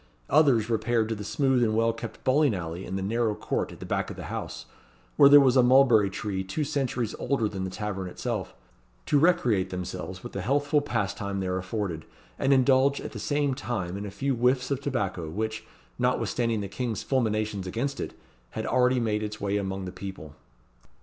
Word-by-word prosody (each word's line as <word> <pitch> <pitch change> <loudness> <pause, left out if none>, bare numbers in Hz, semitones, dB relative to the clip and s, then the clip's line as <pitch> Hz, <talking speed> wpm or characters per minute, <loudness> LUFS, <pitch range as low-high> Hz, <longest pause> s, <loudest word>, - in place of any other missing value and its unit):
Others 135 -8 +4
repaired 115 0 +1
to 115 - -1
the 105 - -6
smooth 130 +3 +1
and 110 -2 +1
well 115 +1 +2
kept 115 - -8
bowling 135 -3 +3
alley 85 +1 -5
in 95 - -4
the 95 - -2
narrow 110 +1 0
court - - -2
at - - -12
the - - -7
back - - -1
of - - -7
the - - -8
house, 60 - -5 0.5
where 140 - +8
there 145 0 +10
was 135 -2 +4
a 130 - +7
mulberry 125 -5 +5
tree 95 -1 -3
two 95 +11 -2
centuries 130 -6 -1
older 135 -6 0
than 95 -2 -4
the - - -3
tavern 95 -1 -4
itself 90 - -4 0.5
to 145 - +3
recreate 125 - +3
themselves 90 0 -6
with - - -8
the 100 - -3
healthful 145 +7 +2
pastime 100 -6 -2
there 90 -1 -1
afforded, 95 -3 -3 0.3
and 135 - +2
indulge 135 +1 +4
at - - -6
the 110 - -7
same 145 +4 0
time 110 -9 -3
in 100 - -5
a 105 - -5
few 135 +8 -1
whiffs 125 +2 +1
of 140 -1 -1
tobacco, 95 - -2
which, 110 +5 -3 0.3
notwithstanding 115 -3 0
the 100 - -4
king's 115 +1 -3
fulminations 110 -6 -1
against 135 +9 -2
it, - - -5 0.3
had - - -5
already 125 0 +3
made 105 -2 0
its 105 0 -5
way 100 0 -1
among 95 -1 -2
the 90 - -5
people. 95 -6 -8
110 Hz, 195 wpm, -27 LUFS, 95-130 Hz, 0.5 s, there